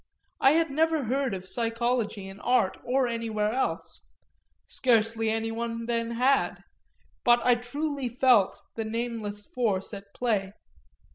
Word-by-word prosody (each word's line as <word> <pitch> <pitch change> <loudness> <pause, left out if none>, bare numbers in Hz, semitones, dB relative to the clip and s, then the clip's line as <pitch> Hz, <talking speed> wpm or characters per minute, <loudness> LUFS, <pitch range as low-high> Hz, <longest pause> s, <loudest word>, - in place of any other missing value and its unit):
I 270 - +6
had 325 -2 +2
never 320 +1 +2
heard 260 -1 0
of 185 0 -7
psychology 230 -1 -1
in 195 +1 -10
art 240 -5 +2
or 255 +2 +1
anywhere 225 -3 -1
else 260 - -3 0.6
scarcely 225 -2 +2
anyone 230 +1 -2
then 230 -1 -1
had; 260 +4 +1 0.6
but 240 0 +6
I 250 - +6
truly 275 +2 -3
felt 240 -5 +3 0.2
the 225 - -2
nameless 220 -2 -4
force 215 -6 -1
at 200 0 -9
play. 205 -5 0
235 Hz, 130 wpm, -27 LUFS, 220-250 Hz, 0.6 s, I